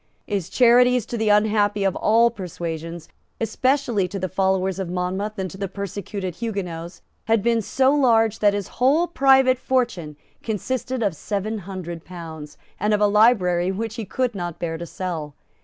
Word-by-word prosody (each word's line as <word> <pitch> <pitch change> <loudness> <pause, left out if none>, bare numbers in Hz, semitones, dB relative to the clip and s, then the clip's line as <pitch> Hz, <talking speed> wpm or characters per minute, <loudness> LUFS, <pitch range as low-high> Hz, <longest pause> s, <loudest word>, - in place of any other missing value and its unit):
His 195 -5 -3
charities 245 -1 +4
to 240 - -5
the 220 -2 0
unhappy 210 -1 +3
of 195 -1 +1
all 230 +2 +3
persuasions, 170 -4 -6 0.3
especially 240 -3 +1
to 195 - -6
the 185 0 -2
followers 190 0 0
of 190 -3 -3
Monmouth 185 +4 -3
and 190 -1 -2
to 190 - -11
the 200 - -2
persecuted 200 -1 -5
Huguenots, 180 -7 -5 0.2
had 225 -2 +2
been 235 -1 +2
so 265 +6 +2
large 225 -6 +3
that 205 -1 +3
his 205 -2 -3
whole 290 +7 +4
private 265 -5 +4
fortune 240 - -1 0.3
consisted 250 +3 -3
of 200 -6 0
seven 210 +5 -3
hundred 175 -3 -6
pounds, 160 -4 -9 0.2
and 210 +2 +2
of - - -1
a 210 - +4
library 200 -4 +3
which 220 +3 -4
he 225 -2 -5
could 250 +5 -1
not 175 -4 -5
bear 170 -1 -3
to 170 - -6
sell. 160 -5 -5
205 Hz, 170 wpm, -23 LUFS, 180-230 Hz, 0.3 s, charities